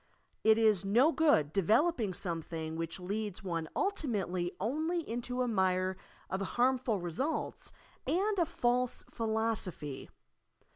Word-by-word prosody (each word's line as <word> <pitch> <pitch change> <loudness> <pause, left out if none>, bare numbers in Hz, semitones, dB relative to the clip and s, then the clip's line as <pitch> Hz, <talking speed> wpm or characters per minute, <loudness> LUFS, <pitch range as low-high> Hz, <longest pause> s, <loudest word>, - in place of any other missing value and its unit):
It 220 0 +6
is 215 -4 +4
no 240 +11 +4
good 290 - +3
developing 220 - +2
something 165 -3 -4
which 165 +2 -4
leads 200 +2 -4
one 165 -4 -3
ultimately 200 - -1
only 315 - -1
into 245 +2 -2
a - - -1
mire 185 -3 +1 0.3
of 190 - -3
harmful 245 +1 +1
results 175 - -3 0.4
and 395 +3 +1
a 340 - +4
false 250 -6 0
philoaopby. 220 - -2
220 Hz, 115 wpm, -32 LUFS, 180-255 Hz, 0.4 s, It